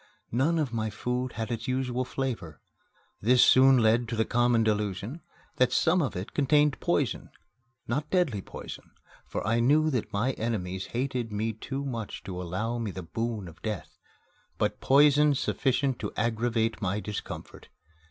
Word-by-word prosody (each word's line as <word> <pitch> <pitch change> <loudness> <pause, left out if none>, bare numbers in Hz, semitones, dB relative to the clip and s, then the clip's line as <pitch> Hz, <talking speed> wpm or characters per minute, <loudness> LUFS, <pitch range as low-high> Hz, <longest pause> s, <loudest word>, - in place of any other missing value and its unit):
None 145 +8 +2
of 145 -6 -1
my 110 -1 -1
food 125 +4 -3
had 115 +1 -4
its 115 +3 -4
usual 130 -1 -1
flavor. 120 - -4 0.6
This 125 +4 +5
soon 130 0 +7
led 115 +1 +3
to 115 - -3
that 110 0 0
common 120 -1 +3
delusion 105 - -1 0.4
that 125 - +3
some 175 +2 +3
of 135 -8 -2
it 90 +2 -5
contained 145 0 +3
poison - - 0 0.6
not 145 +5 -2
deadly 165 - +1
poison, - - -10 0.3
for - - -4
I 115 +3 +2
knew 150 +6 +4
that 125 -5 -2
my 115 +6 +1
enemies 95 -7 -3
hated 125 -2 -2
me 110 +2 -1
too 135 +6 -5
much 115 -6 -5
to 90 -1 -5
allow 110 +7 -2
me 115 -3 -2
the 95 -1 -6
boon 110 +2 -3
of 85 0 -13
death, 105 -6 -5 0.6
but - - -1
poison 145 +1 +5
sufficient 130 0 0
to 105 - -4
aggravate 115 0 0
my 100 +1 0
discomfort. 105 -1 -7
120 Hz, 160 wpm, -28 LUFS, 110-135 Hz, 0.6 s, soon